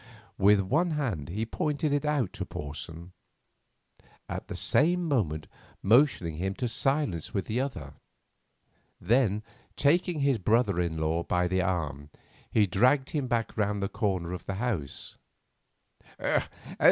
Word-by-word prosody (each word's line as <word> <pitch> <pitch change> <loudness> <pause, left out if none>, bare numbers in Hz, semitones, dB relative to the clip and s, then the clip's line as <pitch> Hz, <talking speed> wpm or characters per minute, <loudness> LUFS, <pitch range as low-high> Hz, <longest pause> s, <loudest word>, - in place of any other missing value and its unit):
With 100 +1 +6
one 150 - +1
hand 95 - -2
he 105 +6 -2
pointed 150 +2 -1
it 145 +1 0
out 145 -10 0
to - - -4
Porson, 80 +4 -7 1.2
at - - -5
the - - -6
same 175 +3 +2
moment 80 - 0 0.4
motioning 110 - +3
him 95 +3 -2
to 125 - -2
silence 120 - 0
with 100 - 0
the 115 +3 -1
other. 135 0 -5 1.1
Then, 110 0 +2 0.3
taking 165 +2 +2
his 140 -4 +2
brother 105 -1 +2
in 85 -2 -1
law 80 +1 0
by 90 +1 +1
the 95 +1 +1
arm, 75 -6 -2 0.4
he 105 - +4
dragged 125 +9 +3
him 145 -4 -1
back 120 -2 -1
round 105 -1 0
the 100 - -1
corner 95 -5 -1
of 90 - -7
the 95 - -2
house. 95 - -3
105 Hz, 140 wpm, -28 LUFS, 90-135 Hz, 1.2 s, With